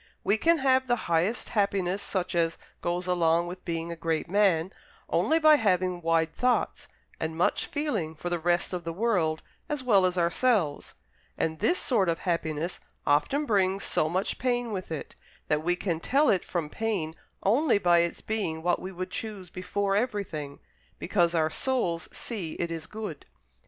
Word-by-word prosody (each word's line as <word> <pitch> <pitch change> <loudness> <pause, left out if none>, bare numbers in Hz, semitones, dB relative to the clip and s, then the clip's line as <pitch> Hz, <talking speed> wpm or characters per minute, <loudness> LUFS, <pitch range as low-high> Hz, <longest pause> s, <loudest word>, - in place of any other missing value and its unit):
We 200 - +3
can 330 +9 +3
have 260 -2 +3
the 240 - +3
highest 175 +8 0
happiness, 200 -3 0
such 185 -1 -2
as 165 -1 +1 0.2
goes 175 +1 -1
along 170 -2 +2
with 180 +1 -8
being 165 -1 -3
a - - -4
great 165 -1 -1
man, 190 -3 +2 0.3
only 320 - +2
by 310 -1 +7
having 185 -5 +1
wide 165 -1 +1
thoughts, 250 +5 0 0.3
and 160 0 -3
much 170 - +1
feeling 215 - -2
for 165 - -6
the 175 - 0
rest 175 +2 +1
of 180 -1 -3
the 165 0 -4
world 180 -6 +1 0.3
as 295 -3 -2
well 200 -7 +5
as 180 0 -3
ourselves; 175 - +1 0.4
and 160 -1 -1
this 350 - +2
sort 205 -9 +1
of 165 - +1
happiness 165 -1 -2 0.3
often 155 - +2
brings 195 -4 +1
so 155 - +1
much 185 +4 -1
pain 245 -2 0
with 185 -4 -5
it, 160 - -5 0.4
that 150 0 +2
we 175 +2 +2
can 175 -3 -2
tell 280 - +3
it 190 - +1
from 170 -4 -2
pain 190 -4 -2 0.3
only 245 +5 +3
by 175 -3 +4
its 170 0 -1
being 180 -8 -2
what 175 0 +1
we 185 - -5
would 185 0 -5
choose 195 -3 -6
before 195 +2 -1
everything, 200 - -2 0.4
because 175 -2 +1
our 160 -1 +2
souls 180 -11 -1
see 190 -9 -5
it 170 -1 -3
is 160 -1 -5
good. 215 -1 -7
180 Hz, 175 wpm, -28 LUFS, 165-215 Hz, 0.4 s, by